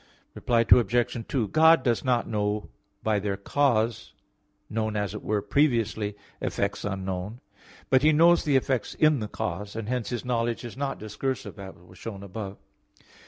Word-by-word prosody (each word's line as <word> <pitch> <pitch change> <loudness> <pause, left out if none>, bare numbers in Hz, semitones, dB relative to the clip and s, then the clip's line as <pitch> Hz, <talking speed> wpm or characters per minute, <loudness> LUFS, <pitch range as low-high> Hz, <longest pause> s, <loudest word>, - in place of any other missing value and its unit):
Reply 120 -1 +1
Obj. 120 0 +3
2: 120 -6 0
God 160 -2 +6
does 120 -3 +1
not 125 -3 +1
know 105 -1 -1 0.3
by 110 -2 +2
their 100 -1 -2
cause, 115 -1 0 0.5
known, 110 -1 -2
as 105 -2 -1
it - - -6
were 105 0 -1
previously, 115 -7 +1 0.3
effects 100 -1 -2
unknown; 95 +2 -4 0.5
but 130 -1 +5
He 155 +2 +5
knows 170 +3 +5
the 145 -2 +1
effects 130 -2 -1
in 155 -3 +4
the 105 - -3
cause; 100 +1 -4
and 110 -2 -4
hence 125 -3 -2
His 120 0 -4
knowledge 120 -1 -1
is 120 - -8
not 135 0 -3
discursive, 110 +1 -4
as 95 -1 -8
was 90 +1 -18
shown 100 -4 -7
above. 100 0 -6
115 Hz, 165 wpm, -27 LUFS, 105-125 Hz, 0.5 s, God